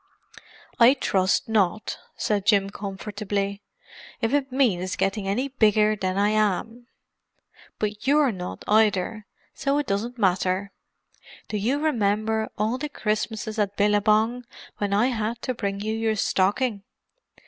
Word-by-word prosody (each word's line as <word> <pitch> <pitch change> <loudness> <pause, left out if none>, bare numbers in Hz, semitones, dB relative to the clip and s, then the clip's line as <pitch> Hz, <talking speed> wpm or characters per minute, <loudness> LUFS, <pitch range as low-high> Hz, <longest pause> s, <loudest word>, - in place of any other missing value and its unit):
"I 245 +3 +7
trust 190 -7 +1
not," 215 -2 0 0.2
said 205 -2 -1
Jim 200 -1 +3
comfortably—"if 205 - -5
it 275 -2 +1
means 195 -9 +1
getting 195 0 -1
any 250 +8 -1
bigger 215 -4 +3
than 185 -2 -2
I 205 +1 +3
am. 215 +3 -1 0.9
But 210 +3 -3
you're 290 -2 +4
not, 180 -3 -7
either, 215 0 +2 0.3
so 280 +1 0
it 295 - 0
doesn't 230 +5 -2
matter. 190 -1 +1 0.8
Do 210 - -2
you 235 +8 0
remember 220 -6 0
all 220 +5 0
the 300 +2 -3
Christmases 215 -2 -3
at 205 -1 -1
Billabong 215 +4 +2 0.3
when 205 -1 -1
I 210 +6 +3
had 230 -1 -2
to 255 - -1
bring 200 -4 -3
you 215 +1 -2
your 225 0 0
stocking?" 205 +3 +1
215 Hz, 130 wpm, -25 LUFS, 200-235 Hz, 0.9 s, I